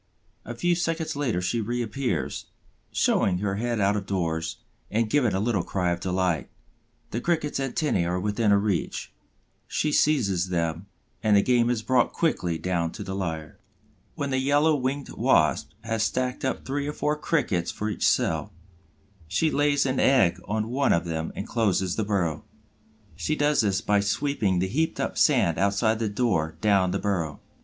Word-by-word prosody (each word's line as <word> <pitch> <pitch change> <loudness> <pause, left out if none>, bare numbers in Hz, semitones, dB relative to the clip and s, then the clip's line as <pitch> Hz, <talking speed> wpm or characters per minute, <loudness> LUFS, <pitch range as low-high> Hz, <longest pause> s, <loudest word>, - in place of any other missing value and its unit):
A 120 - -6
few 175 +9 +1
seconds 165 -2 -1
later 120 -11 -1
she 115 +6 0
reappears, 120 +3 -2 0.4
showing 90 -2 +2
her 100 +1 -2
head 120 0 -1
out 100 +1 +2
of 100 -2 -3
doors 85 -4 -2 0.3
and 115 +1 +1
giving 120 -4 +2
a - - +1
little 105 -2 +1
cry 90 0 -1
of 85 - -2
delight. 90 -4 -1 0.6
The 115 - -2
Cricket's 155 -3 0
antennæ 135 - 0
are 90 +1 -1
within 105 +3 0
her 100 - +6
reach; 100 -4 -2 0.5
she 150 - 0
seizes 100 - +2
them, 85 +1 -2 0.3
and 105 -2 +4
the 100 - +4
game 120 -2 +3
is 120 -3 -1
brought 125 0 +2
quickly 90 - 0
down 85 -2 -1
to - - -6
the 95 - -5
lair. 80 -5 -4 0.6
When 140 -1 -3
the 130 - +1
Yellow 145 +4 +3
winged 140 +1 -2
Wasp 80 - +2
has 115 0 -2
stacked 125 +3 -1
up 130 - -2
three 140 +1 -2
or 150 - -3
four 150 0 0
Crickets 150 - 0
for 105 - -3
each 105 - 0
cell, - - +1 0.8
she 160 - +1
lays 145 -1 +2
an 130 -1 0
egg 95 -10 +4
on 110 +2 -1
one 135 +3 +2
of 85 +1 0
them 80 -1 -3
and 100 - -5
closes 95 -5 +1
the 110 - 0
burrow. 90 -7 -1 0.7
She 90 - -1
does 145 -2 +2
this 100 -3 +1
by 105 0 +2
sweeping 100 -1 0
the 95 +2 +1
heaped 160 +11 -1
up - - -2
sand 85 -2 +3
outside 100 +3 +2
the 110 -2 0
door 95 -8 0
down 100 -4 +3
the 95 - -1
burrow. 90 -8 -2
105 Hz, 175 wpm, -26 LUFS, 90-130 Hz, 0.8 s, her